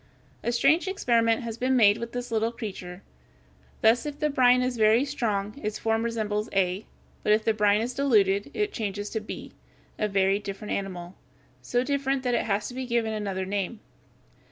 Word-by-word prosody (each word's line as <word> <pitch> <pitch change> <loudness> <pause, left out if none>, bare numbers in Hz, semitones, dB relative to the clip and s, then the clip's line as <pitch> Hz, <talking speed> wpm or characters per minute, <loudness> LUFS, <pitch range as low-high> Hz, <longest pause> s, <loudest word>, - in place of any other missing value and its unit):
A 235 - 0
strange 290 +9 +3
experiment 235 - +2
has 230 -1 -6
been 260 +1 +2
made 210 -4 +5
with 235 0 -5
this 245 -1 -5
little 225 +1 +1
creature; 190 -5 -7 0.8
thus 225 +2 +4
if 290 -1 -5
the 300 0 0
brine 250 -2 +4
is 255 0 -1
very 220 +3 +4
strong 215 -4 -2
its 210 0 -2
form 225 0 0
resembles 220 -2 -2
a, 190 +1 0 0.3
but 210 - +3
if 215 +1 +1
the 225 - +3
brine 210 0 +3
is 245 +2 -3
diluted, 205 -6 +2
it 420 -1 -1
changes 205 -1 -4
to 220 - -1
b, 210 - -8 0.5
a 215 - +1
very 195 0 +2
different 200 +1 -6
animal, 180 -2 -4 0.5
so 245 0 0
different 275 -1 -1
that 250 -1 0
it - - +1
has 205 +2 -1
been 255 0 -5
given 235 -2 0
another 195 -3 -3
name. 200 +3 -3
225 Hz, 180 wpm, -26 LUFS, 205-245 Hz, 0.8 s, made